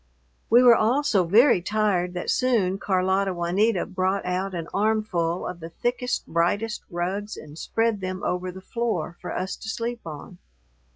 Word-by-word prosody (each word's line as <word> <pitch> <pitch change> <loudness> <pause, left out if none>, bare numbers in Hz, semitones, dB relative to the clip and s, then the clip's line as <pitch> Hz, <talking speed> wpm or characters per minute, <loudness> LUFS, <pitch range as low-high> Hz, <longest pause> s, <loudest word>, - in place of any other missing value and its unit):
We 240 +3 +6
were 245 -1 +9
all 240 +7 +2
so 205 -11 +2
very 210 +3 +5
tired 185 -3 0
that 180 - -1
soon 210 -7 +1
Carlota 190 0 +1
Juanita 185 +4 +1
brought 190 +1 -1
out 185 +1 -2
an 165 -1 -4
armful 200 -5 0
of 180 -1 -5
the 165 0 -8
thickest, 245 +7 -2
brightest 200 +7 0
rugs 190 +5 -3
and 150 -1 -11
spread 225 +4 -1
them 185 +1 -4
over 180 0 -2
the 190 +1 -10
floor 215 -6 -2
for 180 - -5
us 190 +1 -3
to 220 - -8
sleep 235 +1 -3
upon. 165 +3 -9
190 Hz, 165 wpm, -25 LUFS, 180-220 Hz, -, were